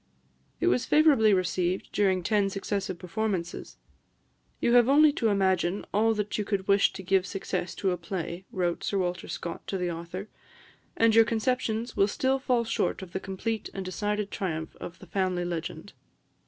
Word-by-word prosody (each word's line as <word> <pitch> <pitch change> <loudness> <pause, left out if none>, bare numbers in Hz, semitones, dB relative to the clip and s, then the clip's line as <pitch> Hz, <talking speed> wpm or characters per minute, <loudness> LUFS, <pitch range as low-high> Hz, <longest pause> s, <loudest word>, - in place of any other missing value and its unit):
It - - 0
was 125 +1 +2
favourably 290 -9 +5
received 185 -1 0
during 190 -3 +2
ten 205 +1 +2
successive 195 -1 -3
performances. 180 -1 -3 0.8
"You 235 - +2
have 245 0 +6
only 300 +2 +6
to 230 - 0
imagine 190 -2 +1
all 220 +2 +3
that 210 0 -2
you - - +1
could 200 -2 -2
wish 200 0 +4
to 190 - -8
give 190 0 +2
success 185 -2 -3
to 190 - 0
a 180 - -1
play," 175 +1 -5
wrote 175 -2 -1
Sir 200 - -1
Walter 180 -1 -2
Scott 170 -1 -6
to 195 - -2
the 180 -1 -1
author, 170 +4 -6 0.7
"and 230 -1 +4
your 225 0 +7
conceptions 230 0 -1
will 195 - +4
still 265 +5 0
fall 250 -3 +1
short 225 -3 -1
of 175 - -11
the 190 - -1
complete 200 +3 -4
and 195 -1 -4
decided 205 +3 -2
triumph 160 -4 -3
of 175 - -8
the - - -13
'Family 185 -1 -1
Legend.' 170 -2 -5
195 Hz, 175 wpm, -28 LUFS, 180-220 Hz, 0.8 s, your